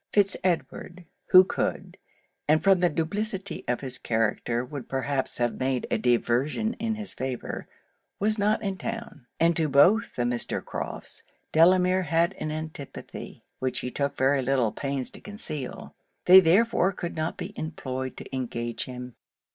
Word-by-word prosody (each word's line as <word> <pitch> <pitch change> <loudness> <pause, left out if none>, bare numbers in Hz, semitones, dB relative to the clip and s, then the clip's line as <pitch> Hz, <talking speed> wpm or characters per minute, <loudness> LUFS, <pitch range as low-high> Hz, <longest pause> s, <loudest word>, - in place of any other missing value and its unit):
Fitz 200 -2 +4
Edward, 180 0 -2 0.2
who 185 0 +9
could, - - -3 0.5
and 155 +1 +3
from 195 -2 +5
the 175 0 +3
duplicity 195 +4 -2
of 125 - 0
his 130 -2 -3
character 115 +2 0
would 135 -1 -8
perhaps 135 0 -1
have 120 -1 -1
made 130 -1 0
a - - +1
diversion 125 - +1
in 225 0 -1
his 215 -2 -4
favour, 130 -1 -4 0.5
was 215 +2 +1
not 210 +2 +2
in 195 -2 -3
town; 225 - -6
and 170 +1 +4
to 155 -2 +1
both 175 +12 +4
the 120 - 0
Mr. 120 0 -2
Crofts - - -5 0.3
Delamere 180 +3 +5
had 170 +2 +1
an 155 - -3
antipathy, 155 -2 -7 0.2
which 130 -1 -1
he 125 - -4
took 140 +1 -2
very 135 +1 +3
little 125 -4 +1
pains 140 0 -3
to - - -10
conceal; 155 - -6 0.3
they 185 +1 +10
therefore 190 +2 +4
could 175 -2 -5
not 160 0 -2
be 205 - -6
employed 130 -5 -5
to - - -7
engage 120 -2 -3
him. 125 -1 -8
155 Hz, 155 wpm, -27 LUFS, 130-185 Hz, 0.5 s, they